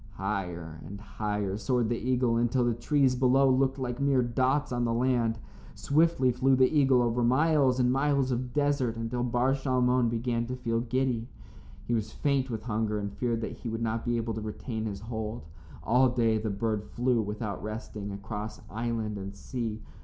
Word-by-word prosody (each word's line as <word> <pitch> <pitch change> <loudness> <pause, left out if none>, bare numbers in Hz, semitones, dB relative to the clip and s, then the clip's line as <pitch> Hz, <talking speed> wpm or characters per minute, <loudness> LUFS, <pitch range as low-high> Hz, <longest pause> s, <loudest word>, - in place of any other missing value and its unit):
Higher 90 -5 -4
and 100 +1 -8
higher 105 -1 -3
soared 120 0 +1
the 120 - +1
eagle 125 -1 +1
until 120 +1 +2
the 120 - +2
trees 130 +3 +2
below 130 +2 +4
looked 130 +1 +2
like 125 -2 -3
mere 140 -2 +3
dots 130 +4 +1
on 120 -1 0
the 115 - +1
land. 120 -2 +1 0.4
Swiftly 145 -3 +2
flew 130 +2 +3
the 130 +4 +3
eagle 135 -4 +4
over 120 +1 +1
miles 135 0 +3
and 125 0 +3
miles 135 -1 +1
of 125 0 -2
desert 140 -4 +1
until 115 +2 -3
Bar 125 +2 +2
Shalmon 125 -3 +2
began 115 0 -1
to 125 - -3
feel 115 -2 -1
giddy. 120 -1 -1 0.6
He 120 - -1
was 110 -2 -1
faint 135 -1 0
with 110 -3 -4
hunger 110 -2 -1
and 100 -1 -4
feared 115 0 -1
that - - -5
he 120 - -5
would 115 +1 -3
not 115 0 -1
be 120 -1 0
able 115 0 -2
to 110 - -4
retain 110 +1 -4
his 100 -2 -5
hold. 110 -2 -5 0.4
All 125 +3 +4
day 115 -3 +2
the 110 0 -2
bird 105 +1 -1
flew 120 +1 0
without 105 -1 -4
resting, 105 -1 -6
across 105 +2 -6
island 110 -1 -2
and 100 +1 -7
sea. 115 0 -4
120 Hz, 185 wpm, -29 LUFS, 110-130 Hz, 0.6 s, below